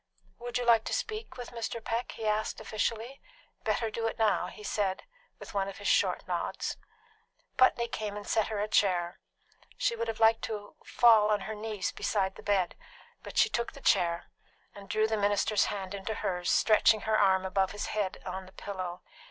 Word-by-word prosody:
"Would 240 +1 -3
you 245 - -2
like 230 -2 +5
to - - -1
speak 440 - -4
with 245 -1 -7
Mr. 230 0 -4
Peck?" 230 +2 -2
he 225 - -6
asked 215 0 0
officially. 220 +4 -3 0.4
"Better 225 -2 0
do 225 +1 -1
it - - -4
now," 220 -2 +2
he 210 - -11
said, 195 -3 -1 0.3
with - - -10
one 195 -1 0
of 195 - -7
his 205 - -5
short - - +2
nods. - - -2 0.8
Putney 240 -2 +4
came 210 -2 -4
and 205 - -8
set 220 - +2
her 215 -2 -3
a 210 - 0
chair. 180 -5 +1 0.6
She 235 - +1
would 230 0 -3
have 225 -1 -4
liked 225 0 +5
to 210 -2 -6
fall 220 -3 +5
on 210 -1 +2
her 215 +3 -5
knees 215 -2 -3
beside 190 -2 -1
the - - -12
bed; 195 -4 +1 0.5
but - - -9
she - - +6
took 235 - -2
the 280 - -11
chair, 170 -9 +1 0.4
and 200 -1 -12
drew 215 0 +2
the 220 0 0
minister's 205 +1 +2
hand 195 -2 -4
into 200 +2 -4
hers, 180 -3 -2
stretching 215 0 +4
her 220 +1 +1
arm 190 -2 +4
above 190 0 +1
his 205 - -4
head 205 -3 -2
on 185 0 -5
the - - -14
pillow. 185 -3 -6
210 Hz, 195 wpm, -30 LUFS, 195-225 Hz, 0.8 s, she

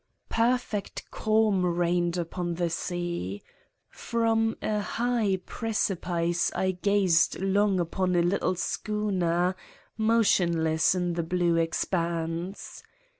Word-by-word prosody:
Perfect 230 -3 -1
calm 215 -3 +2
reigned 175 0 +1
upon 175 0 -3
the 170 -1 -1
sea. 170 - -3 0.4
From 225 -1 0
a 210 -1 -1
high 225 -2 0
precipice 175 -6 -1
I 190 - +1
gazed 185 -2 +2
long 195 0 +2
upon 180 +2 0
a 170 - +3
little 185 +1 +1
schooner, 185 -3 -1 0.4
motionless 175 -8 +3
in 180 -1 -1
the 170 - -1
blue 175 0 +1
expanse. 165 +2 -2
180 Hz, 100 wpm, -27 LUFS, 170-210 Hz, 0.4 s, a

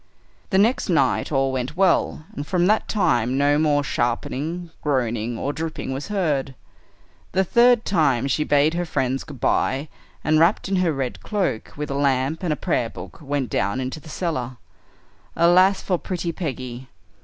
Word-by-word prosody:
The 190 - +2
next 220 +4 +2
night 145 -5 +2
all 135 -2 +1
went 130 +4 -3
well, 185 -4 +2
and 145 +1 -5
from 180 -2 +2
that 215 +3 +2
time 125 - +1
no 145 +1 +3
more 145 -2 +2
sharpening, 145 +8 -2
groaning, 120 -5 -1
or 140 - -2
dripping 155 -4 -4
was 135 +2 -5
heard. 150 -10 -1 0.8
The 190 - +3
third 240 +3 +4
time 140 - +2
she 140 +3 +1
bade 150 +1 +3
her 175 +1 -1
friends 135 -3 -1
good 145 -5 -11
bye 135 +6 0 0.3
and, 155 0 +3
wrapped 170 +6 +3
in 195 0 0
her 180 -2 +2
red 135 -4 -3
cloak, 195 - -2
with 150 -1 -4
a - - -1
lamp 140 +2 0
and 155 -6 -1
prayer 115 -2 0
book, 90 -3 -10
went 140 -5 -2
down 100 +6 0
into 130 +4 -4
the 155 - -14
cellar. 130 -7 -3 0.8
Alas 185 +3 +4
for 180 -3 0
pretty 175 -2 -3
Peggy! 130 -6 -5
145 Hz, 165 wpm, -23 LUFS, 130-175 Hz, 0.8 s, third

